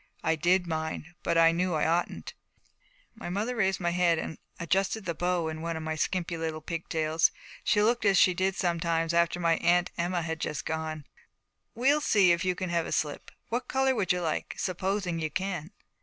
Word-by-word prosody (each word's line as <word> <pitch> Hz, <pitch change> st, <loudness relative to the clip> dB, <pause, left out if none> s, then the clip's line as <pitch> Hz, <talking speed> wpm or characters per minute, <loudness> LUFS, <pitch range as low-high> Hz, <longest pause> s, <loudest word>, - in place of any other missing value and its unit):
I 160 Hz, -, +2 dB
did 175 Hz, +4 st, +2 dB
mind, 160 Hz, 0 st, -4 dB
but 170 Hz, -, 0 dB
I 165 Hz, 0 st, +6 dB
knew 175 Hz, 0 st, 0 dB
I 155 Hz, -, +1 dB
oughtn't. 170 Hz, +2 st, -1 dB, 0.8 s
My 225 Hz, -6 st, -7 dB
mother 210 Hz, +7 st, -2 dB
raised 190 Hz, -4 st, +1 dB
my 175 Hz, -1 st, 0 dB
head 175 Hz, -1 st, +3 dB
and 160 Hz, -, -5 dB, 0.2 s
adjusted 195 Hz, +5 st, 0 dB
the 170 Hz, -, -1 dB
bow 175 Hz, 0 st, 0 dB
on 160 Hz, 0 st, -5 dB
one 165 Hz, 0 st, -3 dB
of 160 Hz, -, -5 dB
my 160 Hz, 0 st, -2 dB
skimpy 170 Hz, +2 st, -1 dB
little 160 Hz, -1 st, -3 dB
pigtails. 160 Hz, 0 st, 0 dB, 0.3 s
She 210 Hz, -, +3 dB
looked 235 Hz, +2 st, +2 dB
as 200 Hz, -2 st, +4 dB
she 185 Hz, -, +6 dB
did 190 Hz, +1 st, 0 dB
sometimes 170 Hz, -2 st, 0 dB
after 170 Hz, +1 st, +2 dB
my 165 Hz, -1 st, +2 dB
Aunt 175 Hz, +1 st, +2 dB
Emma 175 Hz, 0 st, 0 dB
had 160 Hz, 0 st, -3 dB
just 150 Hz, -, -3 dB
gone. 160 Hz, -2 st, -3 dB, 0.7 s
'We'll 280 Hz, +5 st, +3 dB
see 200 Hz, -10 st, +4 dB
if 170 Hz, 0 st, +1 dB
you 185 Hz, -1 st, +1 dB
can 185 Hz, 0 st, -4 dB
have 170 Hz, -1 st, 0 dB
a -, -, -6 dB
slip. 150 Hz, -2 st, -2 dB, 0.2 s
What 240 Hz, +2 st, -2 dB
color 265 Hz, 0 st, +2 dB
would 200 Hz, -7 st, 0 dB
you 180 Hz, 0 st, 0 dB
like 160 Hz, -2 st, -2 dB
supposing 185 Hz, -1 st, -1 dB
you 155 Hz, -1 st, -2 dB
can?' 185 Hz, -3 st, -3 dB
175 Hz, 200 wpm, -28 LUFS, 165-190 Hz, 0.8 s, I